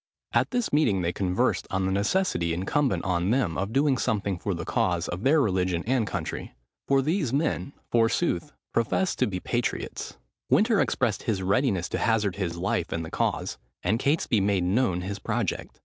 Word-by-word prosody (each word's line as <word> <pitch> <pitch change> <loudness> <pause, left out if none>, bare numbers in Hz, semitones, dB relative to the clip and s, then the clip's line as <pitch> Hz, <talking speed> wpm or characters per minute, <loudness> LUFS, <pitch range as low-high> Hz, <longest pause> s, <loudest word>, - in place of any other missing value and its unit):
At - - +3
this 245 - -1
meeting 110 -12 +3
they 85 +1 0
conversed 90 -1 0
on 95 0 0
the 95 - 0
necessity 100 - +1
incumbent 125 +10 0
on 90 -1 +1
them 115 -8 +1
of 100 +2 -2
doing 135 0 +2
something 100 -5 -1
for - - -2
the - - -5
cause - - 0
of 90 - -4
their 145 +6 +4
religion 90 - +1
and 120 -2 +1
country; 60 - -4 0.3
for 135 -1 +3
these 155 - 0
men, 140 0 -1 0.2
forsooth, 135 +6 +1 0.2
professed 170 - +1
to - - +3
be 90 -3 -3
patriots. 120 +5 -3 0.3
Winter 220 -1 +4
expressed 115 -6 0
his 100 -5 -1
readiness 95 -2 +1
to - - -2
hazard 105 -4 +1
his 85 -4 -2
life 90 +2 -1
in 80 - -2
the 80 - -8
cause; - - -1 0.2
and 105 +6 +1
Catesby 140 -6 +2
made 100 -2 +2
known 95 -1 +1
his 100 +3 -4
project. - - -3
105 Hz, 180 wpm, -26 LUFS, 95-135 Hz, 0.3 s, their